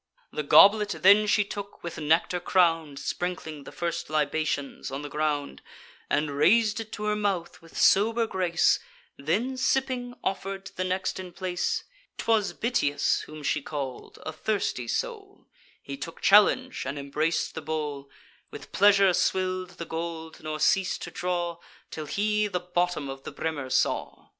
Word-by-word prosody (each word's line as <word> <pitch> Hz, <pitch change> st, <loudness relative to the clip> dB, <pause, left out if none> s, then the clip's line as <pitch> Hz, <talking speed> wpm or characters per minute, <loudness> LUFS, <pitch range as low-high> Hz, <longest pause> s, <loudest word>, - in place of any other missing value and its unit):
The -, -, -2 dB
goblet 205 Hz, +7 st, +6 dB
then 205 Hz, +2 st, +7 dB
she 210 Hz, 0 st, +4 dB
took, 200 Hz, 0 st, -8 dB
with 170 Hz, -1 st, -6 dB
nectar 160 Hz, +3 st, +2 dB
crown'd 165 Hz, -5 st, +2 dB
(Sprinkling 160 Hz, -3 st, -4 dB
the -, -, -9 dB
first 170 Hz, -1 st, -3 dB
libations 155 Hz, -2 st, -1 dB
on 135 Hz, +2 st, -5 dB
the 145 Hz, -, -6 dB
ground,) 150 Hz, -1 st, -2 dB, 0.5 s
And 150 Hz, 0 st, +1 dB
rais'd 210 Hz, +10 st, +3 dB
it 220 Hz, -1 st, -7 dB
to 210 Hz, -, -5 dB
her 210 Hz, 0 st, +1 dB
mouth 200 Hz, -5 st, -2 dB
with 165 Hz, -1 st, -13 dB
sober 225 Hz, +4 st, +4 dB
grace; 180 Hz, -5 st, +2 dB, 0.4 s
Then, 210 Hz, -, -1 dB
sipping, 255 Hz, -1 st, 0 dB
offer'd 195 Hz, 0 st, -3 dB
to -, -, -11 dB
the 185 Hz, -, -1 dB
next 185 Hz, +1 st, -2 dB
in 185 Hz, -1 st, -7 dB
place. 180 Hz, -1 st, -2 dB, 0.3 s
'Twas 220 Hz, -3 st, +1 dB
Bitias 145 Hz, -, 0 dB
whom 155 Hz, -1 st, -10 dB
she 145 Hz, -, 0 dB
call'd, 140 Hz, -3 st, -6 dB
a 155 Hz, -, -3 dB
thirsty 155 Hz, -, -2 dB
soul; -, -, -4 dB, 0.4 s
He 140 Hz, 0 st, -6 dB
took 165 Hz, +4 st, -7 dB
the -, -, -4 dB
challenge, 235 Hz, +6 st, +5 dB
and 140 Hz, +2 st, -4 dB
embrac'd 155 Hz, +4 st, -1 dB
the 160 Hz, -, -5 dB
bowl, 150 Hz, -2 st, -4 dB, 0.4 s
With -, -, -11 dB
pleasure 200 Hz, -1 st, +5 dB
swill'd 185 Hz, 0 st, -1 dB
the 170 Hz, -, -5 dB
gold, 160 Hz, 0 st, -6 dB
nor 155 Hz, 0 st, -4 dB
ceas'd 190 Hz, +3 st, +2 dB
to -, -, -7 dB
draw, 175 Hz, -1 st, -2 dB, 0.3 s
Till 155 Hz, -1 st, -6 dB
he 210 Hz, +4 st, +1 dB
the 180 Hz, -3 st, -2 dB
bottom 175 Hz, -4 st, -1 dB
of 135 Hz, 0 st, -7 dB
the -, -, -7 dB
brimmer 145 Hz, -5 st, -4 dB
saw. -, -, -1 dB
175 Hz, 160 wpm, -27 LUFS, 155-200 Hz, 0.5 s, then